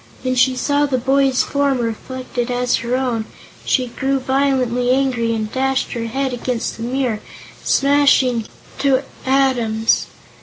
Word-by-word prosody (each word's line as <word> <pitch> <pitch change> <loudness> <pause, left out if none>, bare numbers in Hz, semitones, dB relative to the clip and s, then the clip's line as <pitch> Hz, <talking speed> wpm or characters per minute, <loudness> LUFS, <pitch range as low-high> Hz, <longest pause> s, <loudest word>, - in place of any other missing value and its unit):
When 255 0 0
she 255 +1 +3
saw 290 +2 +1
the 265 -2 0
boy's 265 +1 +2
form 280 -1 0
reflected 245 +1 -4
as 245 0 +1
her 240 +1 -2
own, 245 -4 -1 0.4
she 255 - +1
grew 270 +3 -1
violently 260 -2 +1
angry 250 -3 +1
and 215 -1 -3
dashed 265 0 0
her 230 -1 -3
head 265 +2 -2
against 245 -1 -3
the - - -9
mirror, 245 -2 -1 0.4
smashing 275 -3 +3
it - - -15 0.3
to 270 -1 +2 0.2
atoms. 245 -5 +2
255 Hz, 145 wpm, -19 LUFS, 240-270 Hz, 0.4 s, she